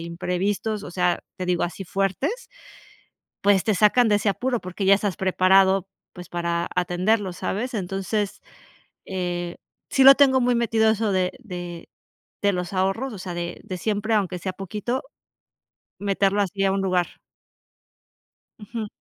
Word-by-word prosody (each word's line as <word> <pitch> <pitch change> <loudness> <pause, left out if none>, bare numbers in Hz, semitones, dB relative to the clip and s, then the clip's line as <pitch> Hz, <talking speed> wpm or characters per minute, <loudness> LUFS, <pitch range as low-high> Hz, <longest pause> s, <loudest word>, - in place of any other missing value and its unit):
imprevistos, 190 +5 -2
o - - -8
sea, 180 -1 +1 0.2
te 185 -1 -4
digo 180 -1 +1
así 175 +3 -5
fuertes, 195 - -2 0.9
pues 200 -2 +4
te 215 - +1
sacan 215 +4 +4
de 210 - +4
ese 205 +1 -1
apuro 245 +4 -1
porque 185 +2 -6
ya 195 - +7
estás 200 -3 -2
preparado, 190 +1 +3 0.3
pues 180 -2 -10
para 170 0 -1
atenderlos, 180 +2 0
¿sabes? 240 +6 -3
Entonces, 195 +1 -2 0.7
eh, 175 -2 -3 0.3
sí 270 - +3
lo 270 +1 +11
tengo 270 -2 +5
muy 245 0 +2
metido 225 -2 +3
eso 220 -1 0
de 185 -1 +1
de 175 -7 -8 0.5
de 200 0 +3
los 180 0 -3
ahorros, 195 +8 0
o 200 - -8
sea, 180 -1 -6
de 175 0 -5
de 185 - -5
siempre 215 +3 -1
aunque 190 -4 0
sea 185 +2 -4
poquito, 210 +7 -3 1.0
meterlo 200 0 +1
así 195 0 -1
a 195 - +3
un 195 - 0
lugar. 180 -2 -1 1.4
Ujú. 215 +1 -5
195 Hz, 150 wpm, -24 LUFS, 180-215 Hz, 1.4 s, lo